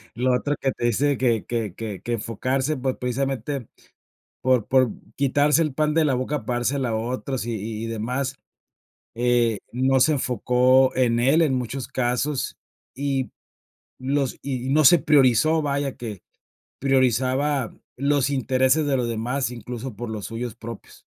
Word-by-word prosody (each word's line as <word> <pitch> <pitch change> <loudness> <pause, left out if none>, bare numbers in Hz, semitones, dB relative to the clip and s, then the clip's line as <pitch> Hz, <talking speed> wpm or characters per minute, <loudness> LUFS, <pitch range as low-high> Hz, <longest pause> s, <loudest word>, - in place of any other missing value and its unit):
lo 125 +1 +1
otro 145 +4 0
que 135 - +1
te 120 - -4
dice 140 +4 +2
que 120 -5 +1
que 115 -5 -3
que 105 -4 -6
enfocarse, 130 +6 -1
pues 130 0 -1
precisamente 135 0 -2 0.7
por 125 -4 +2
por 130 -3 +3 0.2
quitarse 145 +2 +3
el 155 -4 0
pan 150 0 +1
de 165 0 +3
la 135 -3 +2
boca, 130 0 -2
para 120 +1 -1
dársela 130 +1 0
a 110 - -1
otros, 125 +2 -3
y 120 - -3 0.3
y - - -3
demás, 125 +4 -2 0.8
eh, 120 -2 +2
no 130 +2 +2
se 155 - +4
enfocó 125 0 +3
en 120 -2 +2
él 135 +7 +4
en 150 -5 +2
muchos 125 +1 -4
casos, 130 +3 -1 0.4
y 135 -1 -2 0.7
los 135 0 -1
y 130 -2 -3
no 155 +2 +4
se 175 - +8
priorizó, 145 +1 +4
vaya, 140 -2 -1
que 110 -6 -7 0.6
priorizaba 130 0 +1 0.2
los 140 0 +1
intereses 130 +2 +2
de 140 -2 +2
los 125 -2 -1
demás, 120 +3 -2
incluso, 120 0 -7
por 120 +3 -5
los 105 -3 -5
suyos 115 0 -5
propios. 115 -2 -10
130 Hz, 155 wpm, -24 LUFS, 120-140 Hz, 0.8 s, se